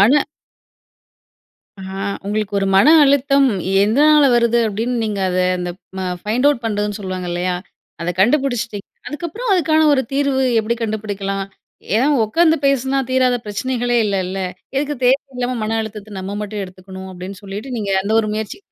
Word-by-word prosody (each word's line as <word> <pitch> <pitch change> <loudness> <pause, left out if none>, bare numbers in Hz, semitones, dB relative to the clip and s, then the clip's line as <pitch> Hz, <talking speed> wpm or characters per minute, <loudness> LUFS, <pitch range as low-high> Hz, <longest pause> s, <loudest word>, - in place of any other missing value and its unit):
மன 265 +9 +5 1.5
அ - - -9 0.4
உங்களுக்கு 210 0 -2
ஒரு 195 - 0
மன 195 +9 +6 0.2
அழுத்தம் 275 0 +3 0.4
எதனால 295 +8 +5
வருது? 235 0 +3
அப்டின்னு 230 +3 -2
நீங்க 210 -2 -2
அத 180 0 -1 0.2
அந்த 180 0 -3 0.6
பைண்ட் 240 +6 +1
அவுட் 285 -5 +2
பண்றதுன்னு 210 -1 -1
சொல்லுவாங்க 185 -2 -5
இல்லையா? 180 +1 -1 0.5
அத 170 +1 -1
கண்டுபிடிச்சிட்டீங்க. 240 -3 +1 0.2
அதுக்கப்புறம் 345 - -4
அதுக்கான 315 -3 +3
ஒரு 270 -2 +3
தீர்வு 275 -1 +1 0.2
எப்டி 225 +2 -2
கண்டுபிடிக்கலாம்? 205 -3 -3 0.5
ஏன்னா 240 +5 +3 0.2
உட்கார்ந்து 320 +9 +3
பேசுனா 270 0 +1
தீராத 255 -1 +3
பிரச்சனைகளே 245 +3 -1
இல்லல. 190 -1 -2 0.4
எதுக்கு 290 +1 -1
தேவையில்லாம 255 -2 0
மன 225 +1 -1
அழுத்தத்த 210 -2 -7
நம்ம 195 +2 -5
மட்டும் 210 0 -4
எடுத்துக்கணும் 190 0 -10
அப்டின்னு 185 +2 -9
சொல்லிட்டு 205 +6 -6
நீங்க 205 -2 -3
அந்த 210 +3 -1
ஒரு 215 - -3
முயற்சி. 215 -1 -4
220 Hz, 140 wpm, -19 LUFS, 200-270 Hz, 1.5 s, மன